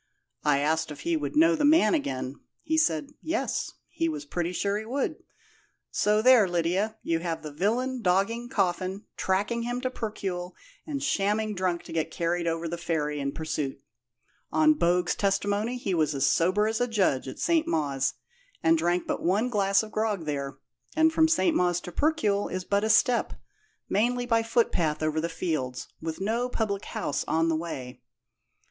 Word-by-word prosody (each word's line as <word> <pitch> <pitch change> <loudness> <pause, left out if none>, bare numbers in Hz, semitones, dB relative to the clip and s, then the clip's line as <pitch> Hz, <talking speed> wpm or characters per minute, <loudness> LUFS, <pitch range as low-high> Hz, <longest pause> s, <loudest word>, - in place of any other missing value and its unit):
I 145 -2 +3
asked 160 +3 +1
if 145 -1 -8
he 170 +2 0
would 145 -3 -3
know 165 +2 +5
the - - -1
man 290 -7 +5
again. 135 - -2 0.2
He 315 - 0
said, 160 - +1
'Yes,' 330 +1 -2
he 330 0 -1
was 305 -1 -5
pretty 175 -10 -2
sure 200 +2 -1
he - - -6
would. 265 +5 -2 0.7
So 210 +1 +2
there, 250 -5 +7
Lydia, 180 +5 0
you 165 -1 0
have 165 -2 -3
the 150 - -6
villain 235 - -1
dogging 210 +5 +1
Coffin, 190 -3 -1
tracking 205 +5 0
him 245 +1 -2
to 255 0 -2
Percuil, 190 -6 -4 0.3
and 285 -2 -3
shamming 215 -5 +1
drunk 180 -3 -1
to - - -9
get 165 -1 -1
carried 170 +1 -1
over 165 0 -1
the 170 +1 -4
ferry 150 -4 -1
in 140 0 -2
pursuit. 150 -3 -3 0.7
On 155 0 +5
Bogue's 175 +2 +2
testimony 205 +4 0
he 200 -6 -2
was 155 -3 +1
as 135 0 +2
sober 185 +9 +3
as 220 +2 -1
a 245 - +2
judge 190 - +1
at 130 - -7
St. 330 -1 +1
Mawes, 140 -4 0 0.5
and 165 0 +4
drank 175 +2 +1
but - - -2
one 205 +8 +1
glass 200 -2 +2
of 215 - -9
grog 215 -6 -1
there, 140 -2 -3 0.4
and 320 0 +4
from 320 0 +5
St. 325 0 +2
Mawes 175 -1 +2
to 180 - -8
Percuil 215 - +1
is 185 0 -3
but 200 +2 +1
a 220 - 0
step, 235 +3 +3 0.5
mainly 245 +4 +1
by 230 -2 +3
footpath 180 -10 +1
over 155 0 0
the 170 - -2
fields, 155 -7 -3
with 160 0 -4
no 230 +5 0
public 210 -4 -2
house 145 0 -2
on 165 +1 +2
the 160 - +2
way." 130 -6 -6
185 Hz, 180 wpm, -27 LUFS, 160-225 Hz, 0.7 s, there